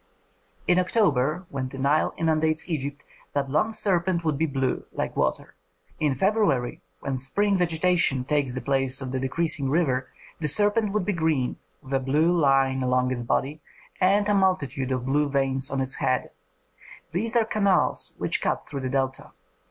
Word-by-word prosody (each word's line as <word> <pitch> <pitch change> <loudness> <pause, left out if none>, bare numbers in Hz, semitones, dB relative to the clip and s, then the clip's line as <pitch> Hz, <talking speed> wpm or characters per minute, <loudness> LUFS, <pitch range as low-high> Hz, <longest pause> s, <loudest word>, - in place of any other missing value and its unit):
In 180 0 +4
October, 175 - +1
when 130 -2 -4
the 135 - -9
Nile 140 +3 +2
inundates 160 -1 +1
Egypt, 145 -3 -4 0.3
that 140 -1 -1
long 155 +9 +2
serpent 180 -4 0
would 155 -2 +1
be 160 +3 0
blue, 135 -2 -1
like - - -3
water. - - -1 0.5
In 150 -4 +1
February, 190 - +1 0.2
when 135 -1 -2
spring 200 +10 +1
vegetation 170 -6 +1
takes 140 -3 0
the 130 - -3
place 135 0 0
of 130 -2 -5
the 130 - -1
decreasing 140 +1 -1
river, 135 -4 +1 0.3
the 155 - -1
serpent 205 +6 +4
would 210 -3 -1
be 205 - 0
green, 160 -7 0 0.3
with 130 - -8
a 135 - +3
blue 150 +6 +2
line 135 -4 +3
along 125 0 +1
its 125 -2 -2
body 140 +5 -1 0.4
and 200 +2 +3
a 210 - +2
multitude 145 -9 +1
of 130 -1 -1
blue 145 +2 +1
veins 135 -1 0
on 135 - -2
its 130 0 -1
head; 130 0 0 0.8
these 220 +7 -1
are 230 -2 +4
canals 200 -4 +1
which - - -1
cut - - -1
through 140 - -5
the 130 - -3
Delta. 135 0 -2
145 Hz, 170 wpm, -25 LUFS, 135-180 Hz, 0.8 s, In